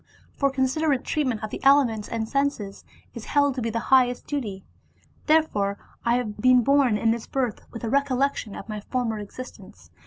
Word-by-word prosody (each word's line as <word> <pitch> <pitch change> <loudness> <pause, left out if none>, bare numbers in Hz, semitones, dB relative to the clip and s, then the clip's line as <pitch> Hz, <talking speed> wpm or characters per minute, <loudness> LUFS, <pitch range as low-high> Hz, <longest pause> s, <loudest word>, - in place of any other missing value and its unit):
For 275 - +2
considerate 270 +1 0
treatment 255 -8 -1
of 215 - -4
the - - -6
elements 265 -6 +4
and 225 -1 -2
senses 275 -7 -2 0.3
is 235 - -8
held 285 -1 +2
to 255 - -4
be 230 - -1
the 230 - -3 0.2
highest 250 -2 +4
duty. 215 -10 -4 0.6
Therefore 210 -11 +2 0.3
I 235 0 +2
have 230 -4 -3
been 255 0 +5
born 275 -4 +3
in 225 +1 +2
this 230 -1 -3
birth 255 -5 -2
with 230 - -9
a 225 - -2
recollection 275 -5 0
of - - -8
my 215 -1 -5
former 225 0 -2
existence. 230 +5 -11
250 Hz, 180 wpm, -25 LUFS, 220-275 Hz, 0.6 s, been